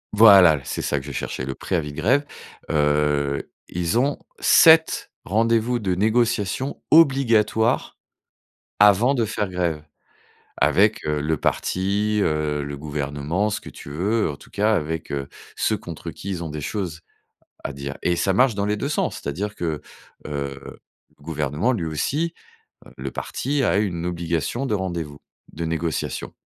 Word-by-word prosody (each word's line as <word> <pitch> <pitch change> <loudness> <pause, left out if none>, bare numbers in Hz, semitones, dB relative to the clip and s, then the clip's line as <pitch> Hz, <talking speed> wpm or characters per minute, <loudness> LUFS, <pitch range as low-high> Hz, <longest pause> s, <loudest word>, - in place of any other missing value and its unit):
voilà, 95 -9 +8
c'est - - -4
ça 75 - 0
que 70 - -11
je - - -5
cherchais 65 - -4
le 65 +1 -4
préavis 80 -5 -2
de 70 - -12
grève. 130 - +2 0.4
Heu, 75 -2 +1 0.2
ils 85 +3 -1
ont 140 +4 +1 0.2
7 160 0 +5
rendez-vous 115 +4 +1
de 95 -5 -1
négociation 115 +4 0
obligatoires 120 -7 +3 0.8
avant 105 +6 +6
de 120 -4 +1
faire 105 -1 -2
grève 85 -4 -2 0.7
avec, 105 +3 +3
heu, 75 -1 0
le 80 +2 0
parti, 100 +7 0
heu, 75 -3 0
le 70 0 -6
gouvernement, 75 +6 -2
ce 105 - -3
que - - -11
tu - - -11
veux, 100 +7 0
en 70 - -6
tout - - -17
cas 105 +2 +2
avec, 80 -2 -3
heu, 70 -1 -3 0.3
ceux - - +1
contre - - -8
qui 100 - -8
ils 90 -3 -3
ont 85 - -4
des 75 0 -5
choses 85 -3 -4 0.6
à - - -3
dire 70 0 -6
et 90 - +2
ça 95 +2 +1
marche 125 +2 +4
dans 100 0 -1
les 105 0 0
2 140 - -3
sens. - - -1
C'est-à-dire 100 +9 -4
que, 80 -6 -3 0.5
heu, 70 -2 -4 0.6
le - - -22
gouvernement, 75 - -1
lui 95 -9 -2
aussi, 145 - -1 0.5
heu, - - -16
le - - -5
parti 145 +1 -2
a 100 - +2
une 90 -5 -1
obligation 85 - -2
de 130 - -1
rendez-vous, 85 -7 -3 0.3
de 85 +1 -4
négociation. 80 -1 -3
90 Hz, 160 wpm, -23 LUFS, 75-110 Hz, 0.8 s, voilà